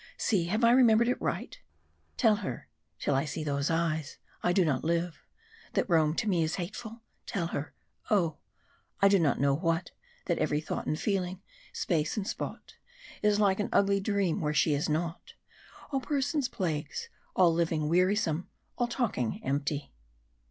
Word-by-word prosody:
See, 190 -7 +1
have 215 +7 -1
I 230 - +7
remembered 235 -2 +5
it 250 - -1
right? - - -3 0.6
"'Tell 220 -4 +4
her, 185 -12 -5 0.3
till - - 0
I 135 +1 +2
see 155 +2 -4
Those 140 -1 -1
eyes, 165 -3 -1 0.2
I 175 - +2
do 180 0 +3
not 140 -5 0
live 170 +1 -1 0.5
that - - +1
Rome 160 -3 +3
to 220 - -1
me 180 -5 +2
Is 160 0 0
hateful, 220 +5 -6 0.2
tell 190 -6 -1
her 145 -2 -4 0.3
oh! 170 -8 +2 0.6
I 200 - +6
know 170 -8 +4
not 140 +2 +2
what 165 -1 0 0.3
That - - 0
every 150 - +1
thought 155 - -4
and 155 - -1
feeling, 190 -2 -1 0.3
space 160 +2 -1
and 200 -2 -2
spot, - - -5 0.5
Is 210 0 +3
like 200 -2 +3
an 205 - -1
ugly 200 0 +3
dream 200 -4 0
where 150 -1 -1
she 155 - +3
is 145 +2 0
not; 165 +2 -3 0.6
All 270 -2 0
persons 285 0 0
plagues; 155 -6 -3 0.3
all 175 -3 +5
living 165 -2 0
wearisome; 180 0 +1 0.3
All 245 - +2
talking 225 - -1
empty...'. 140 - -2
175 Hz, 165 wpm, -30 LUFS, 155-205 Hz, 0.6 s, I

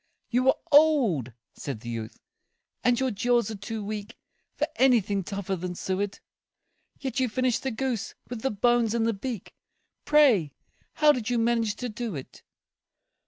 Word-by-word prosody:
"You 250 +2 +2
are 265 - +5
old," 270 - +4 0.2
said 135 -7 -6
the 120 - -7
youth, 115 -2 -6 0.6
"and 245 -1 +3
your 260 -1 +1
jaws 235 +1 +1
are - - -4
too 210 +2 -5
weak 210 +2 -6 0.4
For - - +1
anything 215 -7 +3
tougher 195 +1 -3
than 180 0 -5
suet; 195 +2 -2 0.8
Yet 270 0 -3
you 255 -1 +1
finished 255 +1 0
the 265 - -1
goose, 245 -2 -3
with 245 -2 -6
the 265 - +1
bones 235 +1 +2
and 225 -1 +1
the 230 - +2
beak 220 0 -6 0.5
Pray, 250 - +4 0.4
how 300 -1 +5
did 245 -5 -2
you 245 - +1
manage 230 -2 +1
to 250 - -4
do 230 -3 -4
it?" 135 - -9
230 Hz, 165 wpm, -27 LUFS, 200-250 Hz, 0.8 s, are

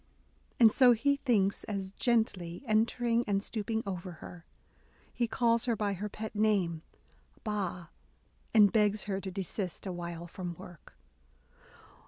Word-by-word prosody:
And 225 -3 +8
so 250 0 +6
he 280 +5 +1
thinks, 205 -8 +1
as, 195 -3 -4
gently 200 -5 0
entering 230 +1 +2
and 200 -1 0
stooping 220 +1 -3
over 185 -2 -5
her, 170 +1 -12 0.7
he 240 - 0
calls 230 0 +2
her 235 -2 +1
by 205 -1 -1
her 205 +3 -4
pet 215 +1 -6
name 200 -7 +1 0.6
Ba," 190 -6 -3 0.6
and 210 -3 +6
begs 210 -1 +2
her 195 -2 -3
to 190 - -5
desist 190 0 -4
a 190 - -3
while 170 -1 -6
from 175 0 -6
work. 175 -2 -13
205 Hz, 140 wpm, -31 LUFS, 185-225 Hz, 0.7 s, And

